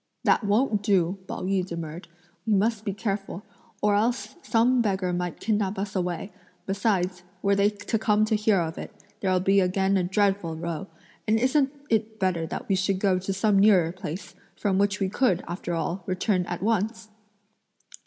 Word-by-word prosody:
"That - - +3
won't 210 +1 +2
do," 195 -3 +1
Pao - - -5
yü 190 0 +1
demurred, 170 -1 -6 0.4
"we 215 - +3
must 215 +2 +1
be 200 - 0
careful, 200 -1 -4 0.4
or 210 -1 +4
else 230 +5 0
some 240 +2 +3
beggar 190 -4 0
might 175 -1 -3
kidnap 205 -3 0
us 200 +1 -4
away; 180 +1 -2 0.3
besides, 195 -3 0 0.2
were 200 0 +3
they 200 +1 +4
to 205 +1 -3
come 215 -1 +3
to 215 - +1
hear 210 -2 +3
of 160 -1 -4
it, - - -7 0.3
there'll 185 -2 +1
be 195 +2 +3
again 190 +1 +2
a 185 - +1
dreadful 195 -2 +1
row; 170 +3 -4 0.4
and 215 +1 +3
isn't 265 +2 +2 0.2
it 220 0 0
better 180 -4 0
that - - -6
we - - +1
should 190 0 +1
go 190 -1 +2
to 190 +2 -3
some 195 +1 +2
nearer 190 -5 +5
place, 180 0 -7 0.2
from 195 -2 0
which 200 0 +1
we 195 - +1
could, 190 -3 +1
after 175 0 -4
all, 170 +3 -2
return 185 0 0
at 175 +1 -4
once?" 220 0 -1
195 Hz, 180 wpm, -26 LUFS, 180-210 Hz, 0.4 s, nearer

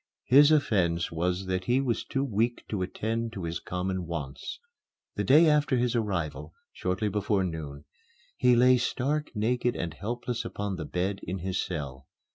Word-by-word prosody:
His 145 +4 +7
offence 95 - +2
was 90 +3 -1
that 95 0 -2
he 125 +2 +3
was 120 -5 0
too 135 - -2
weak 120 -1 0
to 105 -4 -2
attend 115 +5 -2
to 95 - -6
his 85 0 -3
common 90 -1 -3
wants. 80 - -5 0.6
The - - -1
day 155 +5 +6
after 150 -3 +3
his 120 0 +1
arrival, 80 - -2 0.2
shortly 95 +3 -1
before 105 -1 0
noon, 80 -5 -5 0.5
he 125 -1 +4
lay 125 +1 +6
stark 145 +5 -1
naked 120 +3 +1
and 85 -3 -3
helpless 120 +6 -3
upon 100 -2 -4
the 80 - -4
bed 95 +2 -2
in 95 +3 -4
his 95 +1 -2
cell. 70 -6 -6
100 Hz, 165 wpm, -28 LUFS, 85-120 Hz, 0.6 s, His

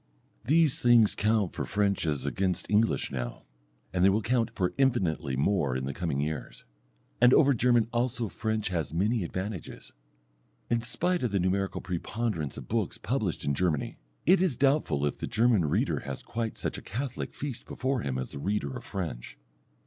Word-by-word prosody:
These 155 -1 +3
things 120 -3 +6
count 105 -3 +1
for - - -3
French 100 -4 0
as 70 -3 -1
against 90 +4 -1
English 110 +2 +2
now, 60 -2 -4 0.5
and 90 -1 +2
they 95 - +7
will 105 +3 +1
count 115 0 +1
for 90 -2 0
infinitely 85 - +1
more 70 -2 +1
in 65 0 -2
the 70 - -3
coming 80 -4 -2
years. 75 +1 -4 0.6
And 125 - +7
over 140 -2 +5
German 120 -1 +3
also 120 -1 0
French 110 +3 -2
has 80 -4 -2
many 105 +4 +1
advantages. 95 +1 -5 0.8
In 120 -1 +2
spite 175 +10 0
of 125 -4 0
the 100 - +1
numerical 95 +2 0
preponderance 90 - -3
of - - -8
books - - -1
published - - -2
in 70 - +1
Germany, 80 -3 -1 0.3
it 185 +2 +5
is 170 -11 +1
doubtful 135 - +2
if 75 - -2
the - - -3
German 110 -5 +3
reader 75 - +1
has 70 -1 -6
quite 115 -1 -3
such - - -3
a - - -13
catholic 125 +4 -5
feast 135 -5 -5
before 130 +1 -1
him 65 -7 -2
as 65 - -4
the - - -7
reader 95 -5 -2
of - - -7
French. 80 -11 -5
100 Hz, 180 wpm, -29 LUFS, 80-120 Hz, 0.8 s, they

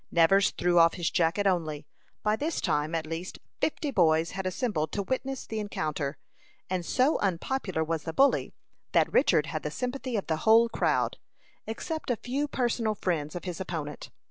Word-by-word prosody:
Nevers 185 +4 +5
threw 175 -1 +2
off 165 0 +5
his 170 -2 -1
jacket 170 +4 +1
only. 160 -6 0 0.4
By 210 0 +2
this 305 +7 -2
time, 150 +2 0
at 160 -1 -1
least 165 +3 -5 0.2
fifty 300 -2 -1
boys 165 -6 +3
had 190 -1 -3
assembled 185 -5 -1
to 200 - -1
witness 260 +4 -3
the 220 - -4
encounter; 155 -8 -3 0.5
and 185 -2 0
so 255 - +2
unpopular 190 -1 -1
was 160 0 -2
the 160 - -4
bully, 275 +12 +3 0.4
that - - +3
Richard - - +4
had - - -4
the - - -3
sympathy 255 0 -3
of 200 - -2
the 160 - 0
whole 225 +6 +5
crowd, - - 0 0.5
except 315 +9 -4
a 245 - +2
few 270 +6 -2
personal 235 -5 0
friends 160 -6 -2
of 175 - -5
his 180 -1 -4
opponent. 155 -5 -5
185 Hz, 175 wpm, -28 LUFS, 165-240 Hz, 0.5 s, Nevers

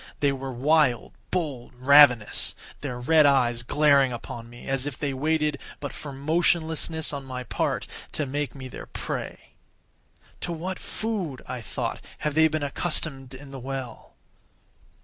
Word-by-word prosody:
They 140 -1 +3
were 135 0 -4
wild, 135 -1 +2 0.2
bold, 145 -10 -3
ravenous—their 130 -1 +4
red 155 +3 +6
eyes 120 -4 +3
glaring 140 +1 +4
upon 115 -1 -7
me 120 0 -12
as 135 0 0
if 145 - -5
they 140 -2 -2
waited 150 +1 +1 0.2
but 145 -2 -5
for 145 - -7
motionlessness 160 +2 +1
on 140 -1 -4
my 130 -1 -5
part - - -1 0.3
to 150 - -1
make 145 0 -3
me 130 -2 -7
their - - -9
prey. - - -5 0.9
"To 175 - -3
what 180 +3 -4
food," 195 - -3
I 125 -1 -5
thought, 110 - -4 0.2
"have 150 - -2
they 160 +1 +6
been 155 -1 -2
accustomed 140 -3 -2
in 135 +1 -11
the 135 - -7
well?" 130 -2 -6
140 Hz, 150 wpm, -26 LUFS, 130-155 Hz, 0.9 s, red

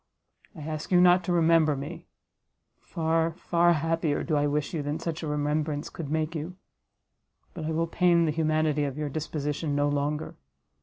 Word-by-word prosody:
I - - -9
ask 155 +2 -5
you 180 - +6
not 180 0 +5
to 180 - -1
remember 165 -3 +4
me, 155 +5 -7 0.7
far, 165 -1 0
far 175 -1 +3
happier 165 -1 0
do 155 - -1
I 145 0 +2
wish 145 +2 -1
you 160 - -1
than 145 +2 -2
such 165 -1 -4
a 160 - -4
remembrance 150 0 -1
could 155 -4 -6
make 155 +1 -1
you; 165 +3 -5 1.0
but 160 - -6
I 160 - -2
will 165 +1 0
pain 170 0 +3
the 155 - +1
humanity 155 -1 +1
of 140 0 -4
your 150 -1 -2
disposition 150 0 -3
no 145 0 +2
longer. 145 +1 -2
155 Hz, 175 wpm, -27 LUFS, 150-165 Hz, 1.0 s, you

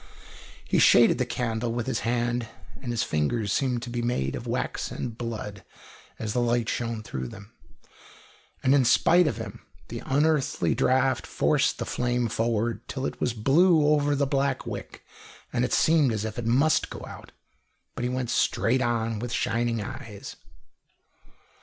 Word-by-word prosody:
He - - +1
shaded 120 - +6
the 125 - 0
candle 115 -1 -2
with 120 -1 -2
his 130 -3 -1
hand, 120 0 -1 0.3
and 130 - -6
his 120 0 0
fingers 95 +8 0
seemed 125 -3 0
to 120 - -6
be 120 0 -2
made 95 - -1
of - - -7
wax - - -2
and 115 -3 -5
blood 110 -5 -6 0.5
as 110 -1 -3
the 125 - +1
light 120 -1 +1
shone 115 -2 -2
through 65 -10 -5
them. 100 - -12 1.1
And 130 - +4
in 140 -2 +5
spite 170 +8 +4
of - - -1
him 110 -4 -7 0.3
the - - -6
unearthly 145 0 +1
draught 130 0 +1
forced - - +1
the - - -3
flame 125 -1 -1
forward, 115 0 -1
till 135 0 -4
it - - -5
was 125 - +1
blue 155 - +4
over 145 -1 +3
the 140 0 +1
black 135 -1 0
wick, - - -7 0.5
and 120 - +1
it 125 - -1
seemed 155 -5 +4
as 110 -1 -2
if 110 +2 -5
it 115 - -3
must 140 +7 +3
go - - -8
out. - - -11 0.6
But - - -6
he 125 - 0
went 125 -1 -2
straight 130 +3 +1
on, 115 -2 0
with 120 +1 -4
shining 115 -1 0
eyes. 115 -4 -8
120 Hz, 170 wpm, -26 LUFS, 115-130 Hz, 1.1 s, shaded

